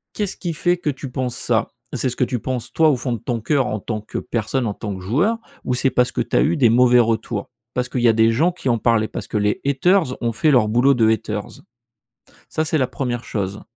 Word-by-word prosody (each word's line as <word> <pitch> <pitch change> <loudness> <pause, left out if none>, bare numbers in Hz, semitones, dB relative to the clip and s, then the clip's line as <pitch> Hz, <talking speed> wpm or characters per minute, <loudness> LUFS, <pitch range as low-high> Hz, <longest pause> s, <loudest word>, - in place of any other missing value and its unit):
«Qu'est-ce 205 -3 -3
qui 175 -3 -3
fait 175 +3 +1
que 170 -3 -2
tu 135 -1 -5
penses 125 -1 -3
ça? - - 0 0.2
C'est 130 - 0
ce 125 - -6
que - - +1
tu 125 -1 -1
penses, 120 0 -4
toi, 160 -1 +4
au 145 - +3
fond 125 0 -3
de 115 - -3
ton 120 -1 -3
cœur, 135 +2 +1
en 105 - -2
tant 110 +1 -4
que 105 - -7
personne, 120 +3 -2
en 105 - -1
tant 100 -1 -5
que - - -9
joueur 155 - +1 0.3
ou 125 - -1
c'est 135 +2 +2
parce 125 0 +2
que - - -1
tu - - -3
as - - +5
eu 160 +2 +2
des 125 -5 +5
mauvais 125 +1 +5
retours? 110 -2 0 0.3
Parce 125 0 -1
qu'il 125 - -2
y 120 - +4
a 115 - +5
des 110 0 +4
gens 155 +10 +2
qui 170 -7 -4
en 115 -2 +2
parlaient? 110 -1 +2
Parce - - -7
que 105 - -2
les 105 0 0
haters 140 +1 +2
ont 115 -1 0
fait 155 +8 +2
leur 120 -6 +4
boulot 125 +5 +3
de 115 -2 +3
haters?» 105 -1 -1 1.0
Ça, 155 - -1
c'est 155 0 0
la 130 - +2
1re 120 -3 -3
chose. 100 -1 -4
125 Hz, 260 wpm, -21 LUFS, 110-140 Hz, 1.0 s, as